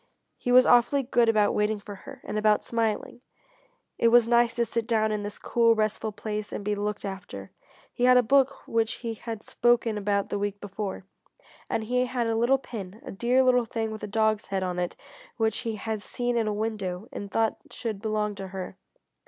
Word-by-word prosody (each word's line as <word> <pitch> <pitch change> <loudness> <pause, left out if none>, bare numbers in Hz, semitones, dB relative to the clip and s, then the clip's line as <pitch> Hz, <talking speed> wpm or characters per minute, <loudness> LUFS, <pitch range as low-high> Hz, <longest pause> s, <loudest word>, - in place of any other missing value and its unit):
He 245 - -3
was 255 +1 +7
awfully 245 +3 +4
good 240 -2 +3
about 210 -2 +3
waiting 210 0 +1
for 205 0 -9
her, 265 +7 -11
and - - -5
about 215 0 +3
smiling. 230 +1 -2 0.8
It 235 - +4
was 235 0 +6
nice 235 0 +4
to 235 - +1
sit 230 0 -2
down 220 -2 +2
in 210 -1 -1
this 205 0 -6
cool, 230 -1 +3
restful 215 0 -1
place 210 0 -5
and 205 - -5
be 210 - +1
looked 210 0 -3
after. 180 - -7 0.4
He 245 - +1
had 250 0 +7
a 250 - +5
book 275 +3 +2
which 225 -1 +1
she 230 -1 -4
had 225 -1 -7
spoken 240 -3 +2
about 200 -1 0
the 205 - -2
week 205 0 -2
before, 195 -1 -5 0.6
and 220 - -1
he 250 +3 +1
had 245 -1 -1
a 225 0 0
little 240 +4 +3
pin, 210 -6 -8
a - - -6
dear 245 +6 +2
little 250 -2 +4
thing 225 0 -3
with 215 - -7
a - - -4
dog's 220 0 +1
head 195 -1 -1
on 180 -1 -2
it 175 -1 -2 0.4
which 220 -2 +1
he 230 -3 -3
had 215 0 -4
seen 245 +3 -2
in 230 -2 +1
a - - +1
window 210 -2 -3
and 200 - -6
thought 225 +1 +1
should 220 -4 -5
belong 215 -1 -1
to 195 -1 -7
her. 190 -1 -7
220 Hz, 210 wpm, -27 LUFS, 205-235 Hz, 0.8 s, was